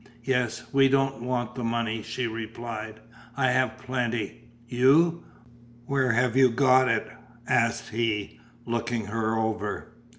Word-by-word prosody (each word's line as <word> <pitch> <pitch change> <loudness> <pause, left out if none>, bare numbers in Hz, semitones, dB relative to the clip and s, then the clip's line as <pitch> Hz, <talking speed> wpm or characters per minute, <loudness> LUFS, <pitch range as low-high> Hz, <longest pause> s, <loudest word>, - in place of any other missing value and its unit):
"Yes, 125 -2 0
we 135 0 +5
don't 135 -2 +1
want 120 -1 -2
the 125 -1 -5
money," 115 -1 -1
she 115 +3 -3
replied, 110 -1 -6 0.4
"I 130 -2 +3
have 130 0 +1
plenty." 120 -3 -3 0.2
"You! 150 +8 +4 0.6
Where 130 -2 +1
have 120 +1 +1
you 130 -1 +6
got 130 +1 +4
it?" 115 -2 +1 0.4
asked 115 -2 +1
he, 110 -2 -2 0.3
looking 115 -1 -2
her 110 +1 -1
over. 110 0 -3
120 Hz, 130 wpm, -26 LUFS, 115-130 Hz, 0.6 s, you